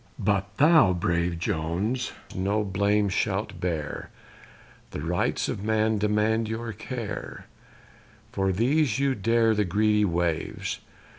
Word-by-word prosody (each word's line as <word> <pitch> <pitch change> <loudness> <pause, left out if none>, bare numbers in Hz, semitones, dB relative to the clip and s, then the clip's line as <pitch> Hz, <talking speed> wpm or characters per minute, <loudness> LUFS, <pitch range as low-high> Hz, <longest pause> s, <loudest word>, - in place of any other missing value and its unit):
But 100 -1 -1
thou, 150 - +6
brave 85 -1 0
Jones, 95 +7 -1 0.2
no 100 +3 0
blame 100 +1 +1
shalt 100 -1 -1
bear, 80 -4 -3 0.8
The - - -6
rights 85 +3 0
of 100 - -4
man 110 0 +1
demand 105 +2 +1
your 115 0 -4
care: 110 -1 -6 0.9
For 95 0 0
these 125 - +2
you 140 0 +2
dare 115 0 +2
the 105 -1 +2
greedy 105 +3 +2
waves. 85 -3 -2
105 Hz, 120 wpm, -26 LUFS, 95-110 Hz, 0.9 s, thou